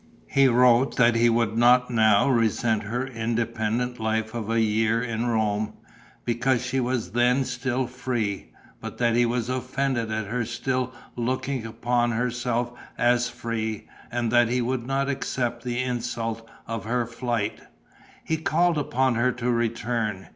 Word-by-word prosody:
He 135 -1 +5
wrote 125 +1 +4
that 120 -2 +5
he 115 +1 +4
would 115 -2 +1
not 125 +2 +4
now 110 -2 +4
resent 115 -3 +2
her 120 +5 -3
independent 115 0 -2
life 110 0 -1
of 115 -2 -4
a 115 0 +2
year 110 +1 +2
in 115 0 -2
Rome, 110 -2 0 0.5
because 120 +1 +1
she 130 +1 -1
was 125 -2 -1
then 125 +3 +2
still 125 0 -1
free, 120 -5 -3 0.3
but - - -7
that 120 -1 +2
he 120 0 +4
was 120 -1 -1
offended 130 -2 -1
at 110 -1 -2
her 120 +4 -2
still 125 +2 -2 0.2
looking 125 0 -2
upon 120 +1 0
herself 120 0 -1 0.3
as 120 0 +2
free 115 -3 -4 0.2
and 120 -1 -1
that 120 -1 +4
he 125 +1 +1
would 125 0 -2
not 135 0 0
accept 120 -3 -2
the 120 -1 -2
insult 115 -2 -3 0.2
of 115 -1 -5
her 120 +1 0
flight. 115 -2 -3 0.6
He 160 - -1
called 165 +1 +2
upon 130 -2 +1
her 120 +2 +2
to 125 0 -1
return. 115 -3 -1
120 Hz, 155 wpm, -25 LUFS, 115-125 Hz, 0.6 s, He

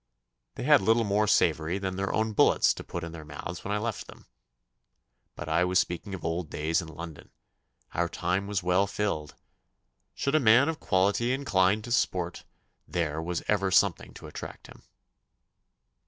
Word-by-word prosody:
They - - -5
had - - +6
little 115 +4 +3
more 105 0 +1
savoury 80 -3 +2
than 95 -1 -3
their 95 +1 -2
own 110 0 0
bullets - - +4
to - - -9
put 85 - -6
in 85 - -6
their 80 -1 -9
mouths 75 +4 -7
when 100 - -4
I 105 - +1
left 110 +1 -4
them. - - -14 1.1
But - - -7
I 80 +2 +2
was 90 +1 +1
speaking 90 +4 -1
of 85 - -9
old 85 -1 -2
days 80 +4 0
in 80 - -9
London. 80 -1 -9 0.6
Our 85 0 0
time 90 +4 -1
was 100 -3 -2
well 90 +2 +2
filled. 100 -7 -3 0.8
Should 140 - -1
a 155 - +5
man 125 +3 +5
of 160 - -3
quality 100 +6 +1
incline 105 -6 +2
to 120 - -8
sport 90 -7 -1 0.4
there 80 -3 -2
was 85 +1 -3
ever 100 -2 +1
something - - +2
to - - -11
attract - - -9
him. - - -14
95 Hz, 175 wpm, -28 LUFS, 85-105 Hz, 1.1 s, had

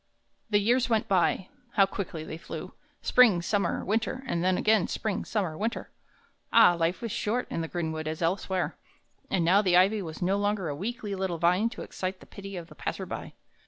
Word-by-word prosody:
The 210 - +4
years 240 +5 +2
went 225 -2 +1
by; 185 0 +2 0.2
how 195 - +6
quickly 185 -5 -5
they 160 +1 -7
flew, 160 -1 -7 0.3
spring, 230 -8 +5
summer, 200 +2 0
winter, 225 +5 -1
and 170 -9 -1
then 185 0 +2
again 215 -3 +3
spring, 215 -3 -2
summer, 190 -8 -1
winter, 225 +6 -3 0.6
ah, 225 -6 +7
life 170 +5 -1
is 230 - -3
short 235 +6 -1
in - - -1
the 165 - -3
greenwood 160 -2 -3
as 155 0 -3
elsewhere! 185 +1 -1 0.5
And 180 -4 +1
now 190 +4 +5
the 180 -3 +4
ivy 200 +3 +4
was 160 -4 -7
no 190 +2 +1
longer 205 -4 0
a 145 - -3
weakly 210 +3 -4
little 190 -3 -2
vine 180 +7 +3
to 230 - -8
excite 185 0 -4
the - - -14
pity 195 -1 -8
of 170 - -6
the 165 - -14
passer - - -4
by. - - -6
190 Hz, 195 wpm, -28 LUFS, 170-210 Hz, 0.6 s, ah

